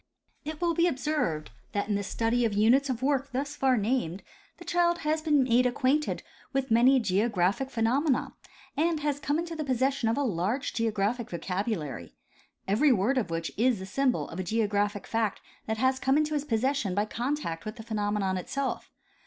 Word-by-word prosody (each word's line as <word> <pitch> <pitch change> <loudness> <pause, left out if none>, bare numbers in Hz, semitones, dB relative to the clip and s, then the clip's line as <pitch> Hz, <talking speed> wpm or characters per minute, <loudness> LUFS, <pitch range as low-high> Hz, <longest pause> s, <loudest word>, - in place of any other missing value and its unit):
It 305 +1 -6
will 340 -1 +1
be 335 +2 +3
observed 260 - -1 0.2
that 205 0 -1
in 210 - 0
the 200 - 0
study 230 +4 0
of 225 -3 +1
units 245 +7 +4
of 255 -1 -2
work 275 0 +1
thus 285 +3 -2
far 260 -2 +2
named 205 -5 -1 0.3
the 345 - -12
child 345 0 +2
has 310 +1 +1
been 300 -3 +3
made 250 0 +3
acquainted 270 +4 0 0.3
with 270 -2 -1
many 250 +4 +6
geo 205 +1 +1
graphic 200 +7 0
phenomena 255 +4 +1 0.4
and 320 +1 +1
has 290 -1 -1
come 290 +1 0
into 335 0 -3
the 310 - -3
possession 265 -2 +1
of 230 - 0
a 285 - +1
large 220 +5 -1
geographic 225 +1 -1
vocabulary, 170 - -3 0.5
every 230 +9 +4
word 245 +4 +2
of 210 - -3
which 165 0 -3
is 240 +1 +3
the 190 - -7
symbol 255 +6 0
of 165 - -7
a - - -1
geographic 205 0 0
fact 225 -3 -1 0.3
that 220 0 -1
has 260 +2 +2
come 270 +1 +2
into 305 0 +1
his 295 -1 -1
possession 245 -4 0
by 205 +1 +1
contact 235 - -3
with 215 +1 -6
the 225 - -9
phenomenon 205 -3 -1
itself. 270 +9 -3
245 Hz, 185 wpm, -28 LUFS, 205-280 Hz, 0.5 s, many